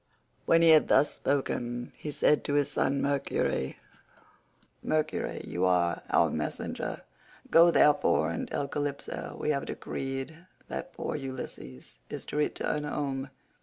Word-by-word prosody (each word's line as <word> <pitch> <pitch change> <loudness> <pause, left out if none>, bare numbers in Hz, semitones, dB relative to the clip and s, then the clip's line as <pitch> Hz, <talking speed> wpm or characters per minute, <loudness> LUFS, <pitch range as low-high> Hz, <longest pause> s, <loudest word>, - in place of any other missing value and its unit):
When 165 0 +5
he 165 - +7
had 155 -1 +6
thus 150 - +4
spoken, 120 -3 -2
he 150 - -7
said 150 0 +2
to 145 - 0
his 145 -1 +2
son 140 +1 +1
Mercury, 140 - 0 1.0
"Mercury, 155 0 -1
you 90 - -3
are 85 -1 +2
our - - +3
messenger, - - -4 0.5
go 170 +1 +8
therefore 145 - +4
and - - -3
tell 140 - -2
Calypso 145 0 -4
we 150 - +1
have 140 -2 -1
decreed 135 +6 -5 0.2
that 180 - -5
poor - - -4
Ulysses 130 - -8
is - - -6
to - - -7
return 150 0 0
home. 140 -2 -3
140 Hz, 135 wpm, -29 LUFS, 130-150 Hz, 1.0 s, go